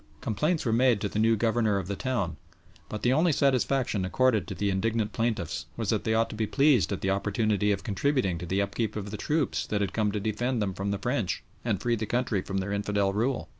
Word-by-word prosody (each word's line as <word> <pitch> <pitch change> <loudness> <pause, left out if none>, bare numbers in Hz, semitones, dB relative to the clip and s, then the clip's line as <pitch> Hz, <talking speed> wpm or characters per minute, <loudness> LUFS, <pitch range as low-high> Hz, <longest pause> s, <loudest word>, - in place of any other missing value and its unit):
Complaints 150 - 0
were 115 - +1
made 120 -2 +4
to - - 0
the 105 - -2
new 115 +1 +4
Governor 110 -1 +1
of 95 - -2
the 100 +2 -3
town, 100 - -2 0.5
but 105 - -5
the 125 - +4
only 160 +4 +3
satisfaction 135 -6 +1
accorded 110 +3 +2
to - - -5
the 100 -1 0
indignant 110 +2 0
plaintiffs 85 -9 -2
was 110 -4 -1
that 110 - -1
they 110 - +2
ought 115 0 +3
to - - -6
be 110 0 -1
pleased 140 -5 +3
at 100 - -3
the 95 - +1
opportunity 105 +1 +1
of 100 - -1
contributing 110 - 0
to 90 - -6
the 95 +3 +1
upkeep 105 +2 -2
of 105 -1 -5
the - - -4
troops 150 +5 -1
that 105 - -1
had 95 -2 -1
come 105 -2 +1
to 105 - -2
defend 115 +4 -1
them 100 -3 -1
from 100 +2 -3
the 100 - -1
French 120 -4 -1 0.2
and 110 -6 0
free 120 -1 +2
the 110 -1 -3
country 115 -4 0
from 95 +1 -4
their 95 +1 -2
infidel 100 -1 0
rule. 120 +5 -1
110 Hz, 240 wpm, -28 LUFS, 100-120 Hz, 0.5 s, made